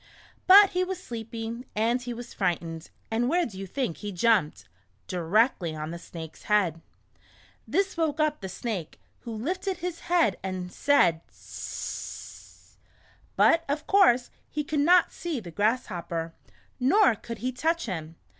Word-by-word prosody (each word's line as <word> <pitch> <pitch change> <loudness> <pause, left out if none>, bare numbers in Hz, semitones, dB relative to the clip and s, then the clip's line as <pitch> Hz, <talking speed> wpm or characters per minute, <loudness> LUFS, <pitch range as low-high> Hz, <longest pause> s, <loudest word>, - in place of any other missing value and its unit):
But 395 +1 +9
he 365 0 +1
was 370 0 -3
sleepy, 230 - -6
and 230 +4 +1
he 245 0 -5
was 240 0 -7
frightened, 165 -1 -2 0.2
and 235 +2 +1
where 345 +3 +2
do 210 - -8
you 195 - -5
think 245 - -2
he 210 -1 -5
jumped? 195 -3 +1 0.4
Directly 180 -1 +1
on 155 +1 -5
the 170 - -6
Snake's 160 -2 -10
head! 185 -6 +2 0.9
This 390 0 0
woke 320 -3 0
up 305 -1 +1
the 190 - -5
Snake, 190 -4 -5 0.2
who 235 - -8
lifted 360 - -2
his 350 -1 -4
head 335 - +2
and 185 -1 -4
said, 180 - +3
"hssssssss." - - -8 0.6
But, 330 0 +5
of 300 +2 -1
course, 350 -12 +4 0.2
he 300 - -2
could 295 +1 -2
not 345 +4 +5
see 335 -6 -3
the 180 -6 -9
Grasshopper, 175 -6 -1 0.5
nor 265 - +5
could 230 +2 -8
he 255 - +1
touch 330 +6 0
him. 165 -6 -5
230 Hz, 150 wpm, -27 LUFS, -, 0.9 s, But